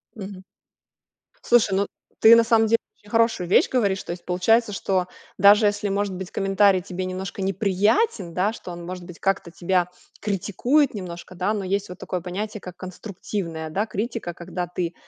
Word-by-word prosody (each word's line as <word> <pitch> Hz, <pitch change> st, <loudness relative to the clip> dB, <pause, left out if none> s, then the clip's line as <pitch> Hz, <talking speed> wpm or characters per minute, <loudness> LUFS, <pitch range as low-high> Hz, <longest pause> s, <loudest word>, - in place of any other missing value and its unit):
Мгм. 195 Hz, -2 st, -8 dB, 1.0 s
Слушай, 230 Hz, -5 st, +3 dB
ну, 200 Hz, +1 st, +1 dB, 0.3 s
ты 225 Hz, +1 st, +9 dB
на 230 Hz, -, +6 dB
самом 225 Hz, -1 st, +3 dB
деле 230 Hz, +1 st, +4 dB, 0.2 s
очень 205 Hz, -, -19 dB
хорошую 230 Hz, -6 st, +2 dB
вещь -, -, +5 dB
говоришь. 200 Hz, -7 st, +1 dB
То -, -, -6 dB
есть, 175 Hz, 0 st, -7 dB
получается, 210 Hz, +5 st, +2 dB
что 185 Hz, -2 st, 0 dB, 0.3 s
даже 205 Hz, +3 st, +7 dB
если 205 Hz, 0 st, -1 dB
может 200 Hz, 0 st, -1 dB
быть 185 Hz, 0 st, -7 dB
комментарий 195 Hz, -1 st, +3 dB
тебе 185 Hz, 0 st, -5 dB
немножко 190 Hz, +1 st, -5 dB
неприятен, 195 Hz, -, +1 dB
да, 190 Hz, +5 st, +1 dB
что 185 Hz, -5 st, -9 dB
он 170 Hz, 0 st, -8 dB
может 180 Hz, 0 st, -7 dB
быть 175 Hz, -1 st, -11 dB
как-то 195 Hz, -3 st, -1 dB
тебя 180 Hz, 0 st, +1 dB, 0.3 s
критикует 220 Hz, -, +1 dB
немножко, 180 Hz, -3 st, -7 dB
да, 190 Hz, +4 st, 0 dB
но 205 Hz, -2 st, -2 dB
есть 200 Hz, +2 st, -1 dB
вот 180 Hz, -, -8 dB
такое 180 Hz, -, -4 dB
понятие, 200 Hz, +5 st, -5 dB
как 180 Hz, -1 st, -9 dB
конструктивная, 180 Hz, -3 st, -5 dB
да, 200 Hz, +7 st, -1 dB
критика, 220 Hz, -4 st, -4 dB
когда 175 Hz, +1 st, -5 dB
ты 175 Hz, -1 st, -3 dB
195 Hz, 175 wpm, -24 LUFS, 180-210 Hz, 1.0 s, ты